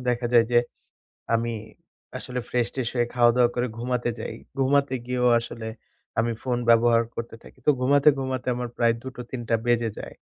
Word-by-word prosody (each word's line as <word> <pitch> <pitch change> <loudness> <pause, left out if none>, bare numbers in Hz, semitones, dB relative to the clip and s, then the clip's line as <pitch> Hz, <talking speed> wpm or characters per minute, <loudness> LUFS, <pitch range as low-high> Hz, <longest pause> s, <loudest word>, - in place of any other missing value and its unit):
দেখা 120 0 +1
যায় 120 -1 +6
যে, 120 - +6 0.8
আমি 115 +1 0 0.7
আসলে 125 0 -4
ফ্রেশ-টেশ 120 0 -1
হয়ে 120 -1 +2
খাওয়া-দাওয়া 120 0 +4
করে 120 +1 0
ঘুমাতে 120 0 -1
যাই। - - -5 0.2
ঘুমাতে 140 0 +2
গিয়েও 125 0 +1
আসলে 115 -1 -7 0.5
আমি 115 +1 +2
ফোন 125 -2 -1
ব্যবহার 115 0 +5
করতে 115 0 -6
থাকি। - - -16
তো - - +7
ঘুমাতে, 140 +3 +4
ঘুমাতে 130 -1 -3
আমার 125 0 -3
প্রায় 115 -1 +3
২ঃ০০-৩ঃ০০ 125 -1 -7
টা - - +2
বেজে 120 -1 +2
যায়। - - -8
120 Hz, 165 wpm, -25 LUFS, 120-125 Hz, 0.8 s, তো